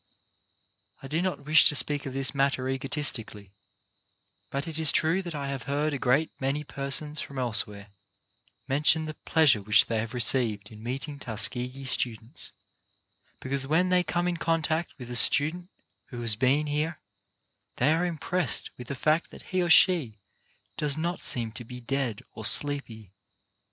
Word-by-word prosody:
I -, -, -7 dB
do 155 Hz, +4 st, -1 dB
not 180 Hz, -6 st, -3 dB
wish 155 Hz, +1 st, +6 dB
to 150 Hz, -, -3 dB
speak 145 Hz, 0 st, +1 dB
of 130 Hz, -, -6 dB
this 135 Hz, 0 st, -2 dB
matter 135 Hz, -2 st, 0 dB
egotistically, 130 Hz, -7 st, -3 dB, 1.0 s
but 140 Hz, +4 st, -3 dB
it 160 Hz, -1 st, -2 dB
is 160 Hz, -3 st, +7 dB
true 165 Hz, +4 st, +2 dB
that 175 Hz, -4 st, -7 dB
I 140 Hz, -1 st, -4 dB
have 135 Hz, -2 st, -4 dB
heard 145 Hz, +2 st, 0 dB
a 140 Hz, -, -3 dB
great 140 Hz, +6 st, +1 dB
many 140 Hz, +3 st, -1 dB
per 140 Hz, -1 st, -6 dB
sons 150 Hz, +1 st, -2 dB
from 140 Hz, -, -8 dB
elsewhere 105 Hz, -4 st, -1 dB, 0.8 s
mention 150 Hz, +3 st, +2 dB
the 155 Hz, -, -5 dB
pleasure 155 Hz, -9 st, +3 dB
which 105 Hz, +1 st, +5 dB
they 115 Hz, -1 st, -2 dB
have 115 Hz, +3 st, -5 dB
received 110 Hz, -3 st, +1 dB
in 110 Hz, 0 st, -12 dB
meeting 135 Hz, +5 st, -5 dB
Tuskegee 125 Hz, +3 st, 0 dB
students, 120 Hz, 0 st, 0 dB, 0.9 s
because 135 Hz, 0 st, -3 dB
when 170 Hz, +5 st, +2 dB
they 180 Hz, 0 st, +3 dB
come 175 Hz, 0 st, -1 dB
in 175 Hz, -1 st, -1 dB
contact 165 Hz, 0 st, -1 dB
with 125 Hz, -2 st, -9 dB
a -, -, -3 dB
student 160 Hz, +8 st, +4 dB, 0.4 s
who 120 Hz, -, -8 dB
has 115 Hz, -2 st, +2 dB
been 135 Hz, +6 st, +2 dB
here, 150 Hz, +2 st, -2 dB, 0.8 s
they 145 Hz, +5 st, +2 dB
are 165 Hz, +2 st, 0 dB
impressed 175 Hz, -3 st, -2 dB
with 125 Hz, -, -8 dB
the 140 Hz, -, -4 dB
fact 155 Hz, +5 st, +1 dB
that -, -, -13 dB
he 185 Hz, -, +2 dB
or 175 Hz, -, 0 dB
she 160 Hz, -, +5 dB, 0.6 s
does 150 Hz, -1 st, 0 dB
not 170 Hz, +3 st, -3 dB
seem 115 Hz, -2 st, -1 dB
to 120 Hz, +3 st, -9 dB
be 125 Hz, +2 st, -9 dB
dead 125 Hz, -3 st, -3 dB
or -, -, -9 dB
sleepy. 115 Hz, -9 st, -1 dB
140 Hz, 170 wpm, -27 LUFS, 125-155 Hz, 1.0 s, is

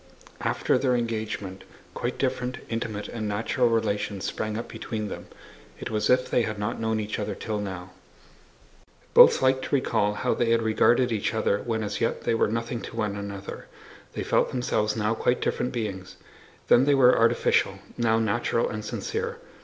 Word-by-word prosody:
After -, -, +1 dB
their 130 Hz, -2 st, +2 dB
engagement, 110 Hz, -5 st, -3 dB, 0.3 s
quite -, -, -3 dB
different, 125 Hz, +1 st, -1 dB
intimate, 115 Hz, -2 st, -3 dB
and 110 Hz, -2 st, -4 dB
natural 115 Hz, +4 st, +1 dB
relations 105 Hz, -3 st, -1 dB
sprang 110 Hz, 0 st, -3 dB
up 115 Hz, -, -5 dB
between 110 Hz, -3 st, -5 dB
them. -, -, -7 dB, 0.5 s
It -, -, -5 dB
was 105 Hz, -1 st, 0 dB
as 125 Hz, 0 st, +5 dB
if -, -, -12 dB
they -, -, +3 dB
had 110 Hz, -2 st, -2 dB
not 105 Hz, +3 st, -3 dB
known 110 Hz, -1 st, 0 dB
each 105 Hz, 0 st, -3 dB
other 105 Hz, -1 st, -3 dB
till 110 Hz, -2 st, -3 dB
now. 95 Hz, -2 st, -6 dB, 1.2 s
Both -, -, +8 dB
liked 130 Hz, 0 st, +3 dB
to -, -, 0 dB
recall 110 Hz, -6 st, +1 dB
how -, -, 0 dB
they 120 Hz, -, 0 dB
had 115 Hz, 0 st, +3 dB
regarded 120 Hz, +3 st, +3 dB
each 110 Hz, 0 st, -1 dB
other 105 Hz, -2 st, +1 dB
when 110 Hz, -1 st, -2 dB
as 105 Hz, 0 st, -4 dB
yet 115 Hz, -, 0 dB
they -, -, +1 dB
were 115 Hz, -, +2 dB
nothing 115 Hz, +2 st, -3 dB
to -, -, -8 dB
one 105 Hz, -3 st, -1 dB
another; 100 Hz, -1 st, -7 dB, 0.5 s
they -, -, -3 dB
felt -, -, +2 dB
themselves 110 Hz, -4 st, 0 dB
now 110 Hz, 0 st, +1 dB
quite 125 Hz, +2 st, +1 dB
different 125 Hz, -, -1 dB
beings: 100 Hz, -6 st, -4 dB, 0.5 s
then 125 Hz, -, +6 dB
they 145 Hz, 0 st, +4 dB
were 125 Hz, -2 st, +6 dB
artificial, 115 Hz, 0 st, +2 dB, 0.2 s
now 115 Hz, -2 st, +2 dB
natural 115 Hz, +1 st, +1 dB
and 110 Hz, 0 st, -5 dB
sincere. 465 Hz, -, -3 dB
110 Hz, 180 wpm, -26 LUFS, 105-120 Hz, 1.2 s, Both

